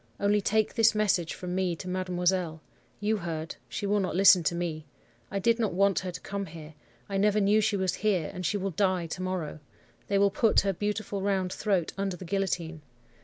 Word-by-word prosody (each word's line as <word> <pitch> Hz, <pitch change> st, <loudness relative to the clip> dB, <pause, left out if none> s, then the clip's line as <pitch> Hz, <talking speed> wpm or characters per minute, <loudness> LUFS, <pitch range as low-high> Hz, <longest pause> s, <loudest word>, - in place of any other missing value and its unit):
Only 205 Hz, +1 st, +2 dB
take 215 Hz, +2 st, +1 dB
this 225 Hz, -2 st, +4 dB
message 190 Hz, -6 st, +1 dB
from 180 Hz, -1 st, -5 dB
me 185 Hz, -2 st, 0 dB
to 185 Hz, -, -9 dB
mademoiselle. 180 Hz, -2 st, -1 dB, 0.4 s
You 215 Hz, +1 st, +1 dB
heard. 165 Hz, -3 st, -5 dB
She -, -, -4 dB
will 205 Hz, +1 st, +2 dB
not 185 Hz, -3 st, -2 dB
listen 190 Hz, -1 st, +7 dB
to 170 Hz, -, +1 dB
me: 160 Hz, -3 st, -4 dB, 0.4 s
I -, -, -3 dB
did 230 Hz, +4 st, +2 dB
not 215 Hz, -6 st, 0 dB
want 200 Hz, 0 st, +3 dB
her 185 Hz, -, -5 dB
to 175 Hz, -, -7 dB
come 200 Hz, -1 st, -4 dB
here. 155 Hz, -1 st, -10 dB, 0.3 s
I 195 Hz, -, -2 dB
never 210 Hz, +1 st, +3 dB
knew 210 Hz, +2 st, +4 dB
she 210 Hz, -1 st, +1 dB
was 190 Hz, -2 st, 0 dB
here, 190 Hz, -7 st, 0 dB
and 185 Hz, -1 st, -6 dB
she 205 Hz, -, 0 dB
will 195 Hz, 0 st, -2 dB
die 185 Hz, -1 st, +1 dB
to 175 Hz, +3 st, -5 dB
morrow. 185 Hz, -5 st, -3 dB, 0.5 s
They 200 Hz, -, +1 dB
will 200 Hz, 0 st, +4 dB
put 220 Hz, +2 st, +3 dB
her 195 Hz, -1 st, 0 dB
beautiful 205 Hz, +1 st, -3 dB
round 190 Hz, -2 st, 0 dB
throat 195 Hz, -6 st, 0 dB
under 195 Hz, -2 st, -2 dB
the 185 Hz, -, -9 dB
guillotine. 175 Hz, -4 st, -2 dB
190 Hz, 210 wpm, -28 LUFS, 175-205 Hz, 0.5 s, listen